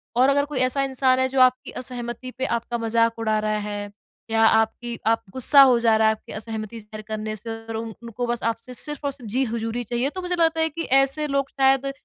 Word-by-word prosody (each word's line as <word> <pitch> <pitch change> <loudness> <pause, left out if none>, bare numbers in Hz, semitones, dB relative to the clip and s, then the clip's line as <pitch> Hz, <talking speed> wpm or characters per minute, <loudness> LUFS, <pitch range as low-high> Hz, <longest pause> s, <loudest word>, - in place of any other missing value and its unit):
और 255 +3 +4
अगर 285 +1 +2
कोई 290 -3 -4
ऐसा 255 +2 +1
इंसान 260 -1 +1
है 260 - +2
जो 265 0 -1
आपकी 255 0 +3
असहमति 245 0 -6
पे 260 - -1
आपका 235 -1 -2
मज़ाक 230 0 +1
उड़ा 220 -1 0
रहा 215 0 -1
है 205 -1 -5 0.4
या 225 0 +3
आपकी 225 +2 +1
आप 225 0 +2
गुस्सा 260 +2 +8
हो 260 -3 +6
जा 230 -1 +3
रहा 220 0 +3
है 220 - +4
आपकी 215 - -13
असहमति 220 0 -6
शेयर 215 +1 -10
करने 215 0 -4
से 215 +2 -10 0.2
और 225 - -5
उन 225 0 -5
उनको 235 +1 -4
बस 240 0 -3
आपसे 230 +2 -3
सिर्फ़ 295 +4 -4
और 285 - 0
सिर्फ़ 255 -5 -10
जी 260 +4 +1
हज़ूरी 230 +1 -3
चाहिए 240 +4 -1
तो 370 +5 -7
मुझे 360 0 -2
लगता 325 -1 +2
है 320 - +1
कि 330 +2 -5 0.2
ऐसे 275 +3 0
लोग 275 -1 -1
शायद 270 0 +2
240 Hz, 235 wpm, -23 LUFS, 225-270 Hz, 0.4 s, गुस्सा